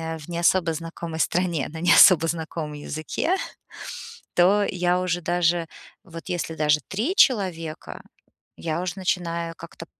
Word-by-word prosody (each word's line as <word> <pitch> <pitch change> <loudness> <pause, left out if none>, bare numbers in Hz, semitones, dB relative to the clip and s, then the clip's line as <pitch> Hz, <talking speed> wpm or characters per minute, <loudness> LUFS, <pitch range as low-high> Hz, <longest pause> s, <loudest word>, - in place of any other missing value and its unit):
э, - - -9
не 170 -1 -4
особо 175 -1 +2
знакомой 165 0 -6
стране, 170 -4 0
да, 160 - -8
на - - -7
не 175 - +6
особо 165 -3 +7
знакомом 160 -2 -4
языке, 155 - -2 1.0
то 195 +4 +4
я 180 0 +1
уже 175 -1 -1
даже 175 -1 +1 0.4
вот 165 0 -10
если 175 -2 -3
даже 150 -1 +2
3 225 - -1
человека, 180 - +1 0.6
я 165 +1 -3
уже 180 -2 -3
начинаю 170 -3 -2
как-то 165 0 -11
170 Hz, 145 wpm, -24 LUFS, 165-180 Hz, 1.0 s, особо